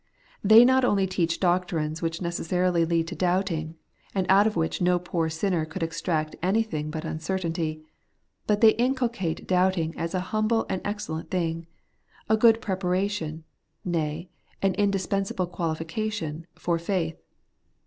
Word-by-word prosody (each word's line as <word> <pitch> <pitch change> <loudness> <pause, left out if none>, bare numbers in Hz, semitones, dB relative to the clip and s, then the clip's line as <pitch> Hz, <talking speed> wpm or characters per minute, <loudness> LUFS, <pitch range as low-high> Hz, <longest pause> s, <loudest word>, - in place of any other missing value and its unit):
They 220 +4 +8
not 260 +1 +4
only 200 -5 +3
teach 175 -3 -1
doctrines 175 -4 0
which 165 +1 -2
necessarily 170 0 +1
lead 165 0 0
to - - -6
doubting, 175 -3 0 0.4
and 190 -2 +1
out 200 +2 +6
of 215 - -2
which 165 +1 -1
no 180 0 +3
poor 170 -2 -2
sinner 165 +1 0
could 160 +1 -5
extract 165 -1 -2
anything 185 -5 0
but 155 0 -5
imcertainty; 165 -1 -3 0.6
but 210 -1 +2
they 225 -1 +8
inculcate 235 -9 0
doubting 180 -3 +2
as 165 +2 -3
a - - +1
humble 215 +1 +2
and 190 - -2
excellent 165 -6 -4
thing; 165 -2 -2 0.6
a 220 - +4
good 225 0 +5
preparation, 185 -4 -1 0.4
nay, 165 -1 -2 0.4
an 195 -1 +3
indispensable 195 -1 0
qualification, 165 0 -3
for 175 -1 -1
faith. 170 -2 -2
180 Hz, 140 wpm, -26 LUFS, 165-195 Hz, 0.6 s, They